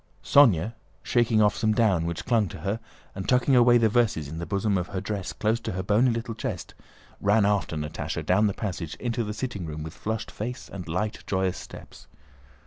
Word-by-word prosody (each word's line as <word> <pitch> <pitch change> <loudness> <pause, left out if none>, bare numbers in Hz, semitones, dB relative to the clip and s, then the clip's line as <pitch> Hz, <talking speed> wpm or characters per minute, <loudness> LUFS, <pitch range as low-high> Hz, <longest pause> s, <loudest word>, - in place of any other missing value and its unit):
Sónya, 115 - +5 0.3
shaking 115 -3 +3
off 105 0 +3
some 110 -1 +1
down 100 -7 +2
which 85 0 -4
clung 115 -4 +2
to 80 - -9
her 100 +5 -2 0.3
and 95 -1 -5
tucking 125 +1 +4
away 120 0 +6
the 115 -1 +4
verses 110 -9 +1
in 80 +3 -6
the 85 - -5
bosom 100 +3 0
of 90 -2 -1
her 95 - -4
dress 100 -1 -4
close 110 +2 0
to 110 -3 -5
her 95 +1 -3
bony 105 +7 +3
little 115 0 -2
chest, - - -5 0.5
ran 105 +1 +3
after 100 -5 +1
Natásha 75 0 -4
down 100 +4 +3
the 100 - -1
passage 90 -7 -4
into 120 -1 -2
the 105 - -4
sitting 105 -3 -4
room 75 0 -5
with 80 - -7
flushed 110 +1 -4
face 125 +4 -5
and 90 -3 -6
light, 105 +6 -2
joyous 95 -1 0
steps. - - -12
105 Hz, 205 wpm, -26 LUFS, 95-115 Hz, 0.5 s, away